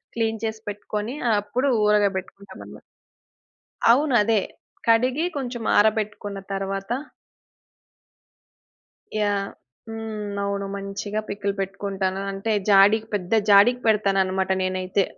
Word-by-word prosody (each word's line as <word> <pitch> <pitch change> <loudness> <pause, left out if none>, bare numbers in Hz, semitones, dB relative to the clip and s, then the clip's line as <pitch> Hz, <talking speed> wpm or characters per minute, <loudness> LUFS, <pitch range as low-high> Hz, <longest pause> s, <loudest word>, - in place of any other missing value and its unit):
Clean 225 -1 -1
చేసి 220 -1 -3
పెట్టుకొని 210 +3 -4 0.3
అప్పుడు 245 +7 -1 0.2
ఊరగాయ 210 -1 +4
పెట్టుకుంటాం 190 +1 -9
అన్నమాట. - - -12 1.1
అవును 275 +2 +3
అదే. 220 -1 +2 0.5
కడిగి 250 +7 +3
కొంచెం 245 -4 -4
ఆరబెట్టుకున్న 210 -1 +1
తరవాత 195 +2 -3 2.2
యాహ్! 205 -2 0 0.4
హ్మ్ 215 -2 -5
అవును 200 0 -2
మంచిగా 200 +1 -4
పికిల్ 200 0 -2
పెట్టుకుంటాను. 195 0 -2
అంటే 195 +3 -3 0.2
జాడికి 205 +2 +5
పెద్ద 185 0 -3 0.2
జాడికి 240 +5 +6
పెడతానన్నమాట 195 -3 +2
నేనైతే 185 +1 0
205 Hz, 100 wpm, -23 LUFS, 195-220 Hz, 2.2 s, జాడికి